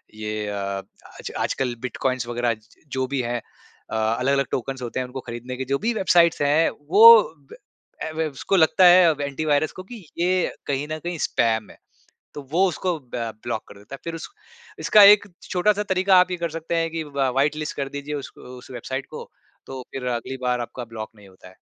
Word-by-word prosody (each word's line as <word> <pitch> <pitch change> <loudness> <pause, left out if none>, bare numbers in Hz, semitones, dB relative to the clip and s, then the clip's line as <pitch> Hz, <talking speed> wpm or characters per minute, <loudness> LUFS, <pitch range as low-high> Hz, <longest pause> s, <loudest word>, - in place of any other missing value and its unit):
ये 105 -1 -4
अ, 100 -1 -3 0.4
आज - - -6
आजकल 125 -2 -1
बिटकॉइन्स 130 0 -2
वग़ैरह 120 0 0
ज 110 0 -16 0.3
जो 130 0 -1
भी 135 0 -1
हैं। 120 0 -3 0.5
अ, - - -3
अलग-अलग 125 +5 +1
टोकन्स 135 +1 -3
होते 120 +1 -4
हैं, 130 - -2
उनको 130 +1 -7
खरीदने 120 +2 -6
के, 130 - -4
जो 140 +2 0
भी 235 +2 0
वेबसाइट्स 175 -6 +3
हैं, 145 +3 +3 0.2
वो 220 +4 +9 0.3
ब - - -9 0.5
ऐ - - -5
वेव 160 -2 -1
उसको 165 +8 -2
लगता 180 +1 +5
है 180 0 +8
अब 150 -2 -1
एंटी 140 +2 -3
वायरस 150 +1 +2
को 185 - -7
कि 215 +6 -11 0.2
ये 180 +1 +1 0.2
कहीं 140 +1 -2
न 155 - -2
कहीं 175 0 -4
स्पैम 110 -2 0
है। - - -15 0.6
तो 145 - -7
वो 185 +4 +4
उसको 175 0 -2 0.2
ब 120 -1 -2 0.2
ब्लॉक 120 -2 -3
कर 100 - -13
देता 105 +7 -12
है। - - -8
फ़िर 170 -1 -4
उस 165 - -7 0.5
इसका 210 - +6
एक 205 - -15 0.2
छोटा-सा 205 +3 +2
तरीका 190 -1 +3
आप 180 0 +5
ये 180 - -2
कर 170 -1 -3
सकते 165 +1 -3
हैं 165 0 0
कि 165 0 -4
व 140 -2 -1
व्हाइट 145 +4 +1
लिस्ट 155 0 -5
कर 140 -1 -3
दीजिए 145 +1 -5
उसक 140 -2 -7
उस 125 0 -12
वेबसाइट 130 +2 -5
को, - - -9 0.4
तो 130 -1 -7
फ़िर 130 -2 -5
अगली 125 +3 -6
बार 125 -1 0
आपका 120 +1 -6
ब्लॉक 110 -2 -8
नहीं 100 -1 -16
होता 95 -1 -16
है। 95 - -19
140 Hz, 215 wpm, -23 LUFS, 120-170 Hz, 0.6 s, वो